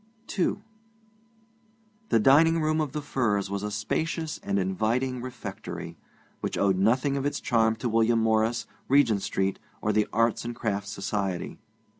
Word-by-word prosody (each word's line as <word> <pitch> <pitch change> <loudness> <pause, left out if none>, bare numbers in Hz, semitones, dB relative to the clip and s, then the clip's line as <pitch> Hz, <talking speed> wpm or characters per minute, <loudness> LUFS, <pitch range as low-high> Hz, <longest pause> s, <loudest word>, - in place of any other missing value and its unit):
II 200 +2 0 1.5
The 115 - +4
dining 160 +8 +5
room 155 0 +1
of 150 -3 -2
The 150 - -3
Firs 105 -8 0
was 100 0 -2
a 105 - -3
spacious 155 +9 -2
and 100 0 -1
inviting 110 +7 0
refectory, 130 0 -7 0.4
which - - -3
owed 95 -2 +2
nothing 130 +7 +2
of 135 - -2
its 145 - -2
charm 115 -2 +2
to 115 - -3
William 115 0 +3
Morris, 110 +1 +1 0.2
Regent 125 -7 +4
Street, 95 0 -1 0.2
or 105 - 0
the 105 0 +2
Arts 115 0 +1
and 120 0 -5
Crafts 100 -4 -2
Society. 95 -2 -3
115 Hz, 150 wpm, -27 LUFS, 100-135 Hz, 1.5 s, dining